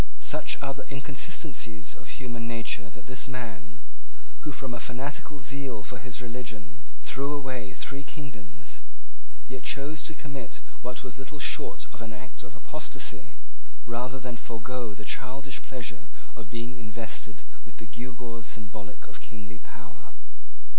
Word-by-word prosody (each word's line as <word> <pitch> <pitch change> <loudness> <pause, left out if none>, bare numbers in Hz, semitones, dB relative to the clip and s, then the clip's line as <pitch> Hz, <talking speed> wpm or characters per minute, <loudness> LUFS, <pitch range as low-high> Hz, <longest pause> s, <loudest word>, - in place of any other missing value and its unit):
Such - - +4
are 135 - +4
the 135 - -4
inconsistencies 135 - +2
of - - -8
human 120 -3 +1
nature 115 -4 +3
that 95 - -9
this 130 +1 +2
man, 110 -6 -1 0.6
who, 150 - +1
from 135 -3 +1
a 120 - +1
fanatical 140 +4 +1
zeal 130 -3 +2
for 125 +2 -2
his 125 -1 0
religion, 115 -3 -2 0.2
threw 140 +2 +4
away 130 -8 +1
three 140 0 0
kingdoms, 120 - -5 0.7
yet 130 0 -1
chose 145 +5 +4
to 160 - -3
commit 140 -5 -2 0.2
what 125 +1 0
was 130 +1 -2
little 140 +3 -2
short - - +4
of 115 - -6
an 110 -1 -1
act - - -6
of - - -7
apostasy, - - +1 0.5
rather 125 +3 +2
than 125 -2 0
forego 115 -1 +1
the 105 - -4
childish 135 +3 +1
pleasure 125 -5 -2 0.3
of 110 -3 -5
being 120 +2 0
invested 110 -1 0 0.2
with 110 - -12
the 110 - -4
gewgaws 115 0 -2
symbolical 105 -2 -3
of - - -7
kingly 105 -1 -5
power. - - -10
120 Hz, 145 wpm, -34 LUFS, 110-135 Hz, 0.7 s, Such